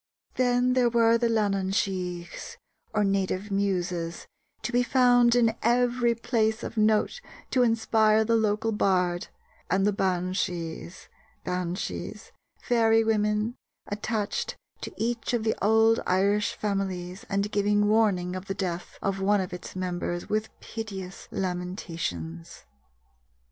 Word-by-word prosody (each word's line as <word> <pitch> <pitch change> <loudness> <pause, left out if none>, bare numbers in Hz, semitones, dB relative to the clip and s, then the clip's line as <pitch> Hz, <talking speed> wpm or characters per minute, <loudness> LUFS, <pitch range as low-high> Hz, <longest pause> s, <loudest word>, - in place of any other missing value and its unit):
Then 250 0 +2
there 250 -2 +3
were 230 0 +4
the 235 -1 +2
Leannan 200 -4 +1
sighes, 180 -4 -3 0.3
or 215 -2 +1
native 195 0 0
Muses, 180 -4 -1 0.4
to - - -2
be 245 0 +3
found 245 -1 +4
in 230 -2 +3
every 240 0 +2
place 220 -1 0
of - - -5
note 215 - +2 0.3
to 255 - +3
inspire 220 -2 +3
the 230 +1 +2
local 220 0 +1
bard, 180 -4 +1 0.4
and 195 +1 +2
the 205 - +2
Beansighes 180 -2 -2 0.4
(Banshees, 180 0 -4 0.3
fairy 225 -2 +4
women) 210 +1 +1 0.3
attached 210 0 -3 0.2
to - - -5
each 235 +1 -2
of 230 - -1
the 220 - +2
old 220 +2 +4
Irish 200 +3 +2
families 190 -3 -3
and 200 +1 0
giving 205 0 +2
warning 200 -5 +2
of 185 0 -6
the 195 - -3
death 180 -3 -4
of 195 0 -1
one 205 +1 +3
of 185 -2 -3
its 180 - -8
members 175 -1 -3
with 215 +1 -1
piteous 195 -4 -7
lamentations. 170 - -4
205 Hz, 130 wpm, -27 LUFS, 185-225 Hz, 0.4 s, were